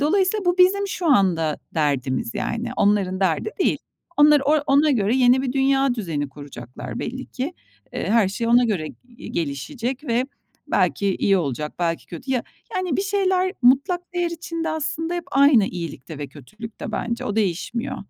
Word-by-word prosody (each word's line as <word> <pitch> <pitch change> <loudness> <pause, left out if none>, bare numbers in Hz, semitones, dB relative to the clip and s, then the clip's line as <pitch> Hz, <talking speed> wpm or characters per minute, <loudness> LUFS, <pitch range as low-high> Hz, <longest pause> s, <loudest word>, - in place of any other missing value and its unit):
dolayısıyla 380 +6 +2
bu 355 +1 +1
bizim 400 +2 +4
şu 360 -2 -3
anda 180 - +3 0.2
derdimiz, 130 -6 0
yani. 235 +1 -2
Onların 195 -2 +2
derdi 185 - +1
değil. - - +2 0.4
Onlar 295 0 +6
o 295 +3 +4
ona 290 +2 +4
göre 225 -2 +2
yeni 255 0 +4
bir 255 -2 -2
dünya 270 -1 +2
düzeni 165 - -3
kuracaklar 135 -3 -9
belli 260 +2 -5
ki. 275 +6 -4 0.4
Eee, - - -3
her 225 -4 +4
şey 230 +4 -3
ona 240 +1 +5
göre 190 -9 -1 0.4
gelişecek 230 - -3
ve 240 -1 +1 0.4
belki 200 -2 +1
iyi 195 -1 +3
olacak, 150 -2 -3
belki 170 -1 -1
kötü. 245 +11 -8
Ya, 245 - +1 0.3
yani, 365 -6 -1
bir - - 0
şeyler 380 -2 +1
mutlak 280 +9 +4
değer 350 -1 0
içinde 335 -1 -4
aslında 315 +2 -2
hep 345 -1 -3
aynı 275 -6 +5
iyilikte 165 -5 -6
ve 145 - -4
kötülükte 215 - -9
bence. 235 0 -2
O 210 - -3
değişmiyor. 230 +7 -1
245 Hz, 160 wpm, -22 LUFS, 180-300 Hz, 0.4 s, Onlar